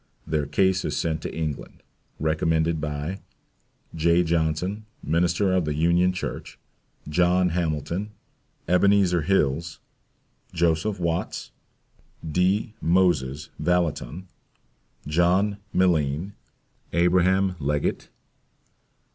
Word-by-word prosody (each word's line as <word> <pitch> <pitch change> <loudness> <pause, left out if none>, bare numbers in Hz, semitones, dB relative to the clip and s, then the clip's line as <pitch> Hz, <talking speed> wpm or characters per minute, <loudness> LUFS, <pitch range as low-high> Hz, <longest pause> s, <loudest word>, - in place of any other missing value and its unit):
Their 75 -2 -1
case 95 +5 +2
is - - -2
sent 80 -1 -1
to - - -5
England, 80 -3 -5 0.4
recommended 80 +1 +1
by 75 +5 -4 0.7
J. 85 +2 +3
JOHNSON, 85 +6 -1 0.2
Minister 85 +4 +1
of 90 -3 +2
the 75 -1 -2
Union 85 +3 +3
Church. 90 - -6 0.5
JOHN 90 +3 +2
HAMILTON. 85 +3 -2 0.6
EBENEZER 90 0 +3
HILLS. 80 -2 0 0.7
JOSEPH 85 +4 +1
WATTS. 85 -1 -2 0.8
D. 95 +7 +1
MOSES 75 -5 +1
VALLOTTON. 90 0 -1 0.8
JOHN 90 +6 +2
MILLENE. 85 0 +1 0.6
ABRAHAM 90 +2 +3
LEGGETT. 75 0 -1
85 Hz, 90 wpm, -25 LUFS, 80-90 Hz, 0.8 s, J